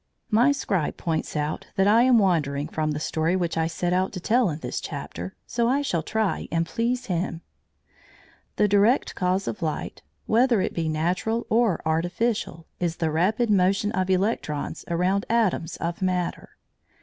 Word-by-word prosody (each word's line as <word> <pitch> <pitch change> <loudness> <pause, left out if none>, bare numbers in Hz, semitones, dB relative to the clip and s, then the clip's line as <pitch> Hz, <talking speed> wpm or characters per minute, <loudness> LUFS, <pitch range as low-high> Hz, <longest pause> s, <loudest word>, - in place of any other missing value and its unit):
My 240 +6 +5
scribe 195 - -1
points 160 -1 -2
out 150 +1 -2
that 195 - +3
I 220 +3 +6
am 250 -1 +5
wandering 150 -8 +1
from 155 -1 -2
the 150 -1 -2
story 160 +3 0
which 175 -3 -1
I 160 0 +1
set 175 +1 -1
out 185 +1 +1
to 185 - -4
tell 230 +3 +2
in 150 - -3
this - - -4
chapter, 90 +3 -6
so 235 -1 0
I 280 +3 +2
shall 170 - 0
try 220 +5 -1
and 165 0 +1
please 240 +6 -1
him. 170 -2 -2 1.1
The 210 - +3
direct 205 +6 +3
cause 185 +1 0
of 210 - -4
light, 155 -2 -3 0.2
whether 235 0 +3
it - - -1
be 165 -2 -1
natural 180 +9 -1
or 225 -6 +2
artificial, 170 +2 -1
is 170 -2 -1
the 160 -3 -1
rapid 210 +8 +1
motion 195 +2 +2
of 185 0 -1
electrons 185 -6 -1
around 180 +4 +1
atoms 220 -8 +1
of 170 +3 -4
matter. 180 -2 -2
185 Hz, 170 wpm, -25 LUFS, 165-220 Hz, 1.1 s, I